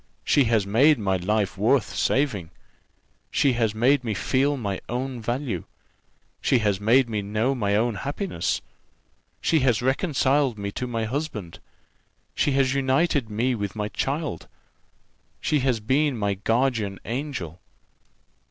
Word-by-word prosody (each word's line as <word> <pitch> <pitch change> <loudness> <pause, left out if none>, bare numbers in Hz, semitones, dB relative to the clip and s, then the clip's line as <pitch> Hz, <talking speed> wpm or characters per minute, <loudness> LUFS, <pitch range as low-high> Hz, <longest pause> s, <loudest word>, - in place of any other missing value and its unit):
She 140 - +4
has 110 -3 +2
made 135 +9 +4
my 95 -3 0
life 100 +1 -1
worth 115 +4 +2
saving. 120 - 0 0.8
She 140 -3 +2
has 115 -3 0
made 130 +4 +3
me 110 -3 -2
feel 135 +9 +1
my 100 -6 -3
own 125 +1 -3
value. 120 - -3 0.8
She 130 - +3
has 105 -3 0
made 120 +5 +4
me 110 -2 -2
know 110 +6 0
my 100 -6 0
own 115 +2 +2
happiness. 145 - -2 0.8
She 160 - +3
has 125 -4 +2
reconciled 135 - +1
me 100 0 -4
to 125 - -4
my 115 -2 -2
husband. 120 - -4 0.7
She 145 - +1
has 135 -1 +2
united 135 -1 +1
me 120 +5 0
with 100 -3 -4
my 105 -1 -2
child. 140 - -3 0.9
She 150 - +1
has 130 -3 +1
been 135 +5 +1
my 100 -2 0
guardian 110 0 0
angel. 115 - -4
120 Hz, 140 wpm, -25 LUFS, 105-135 Hz, 0.9 s, She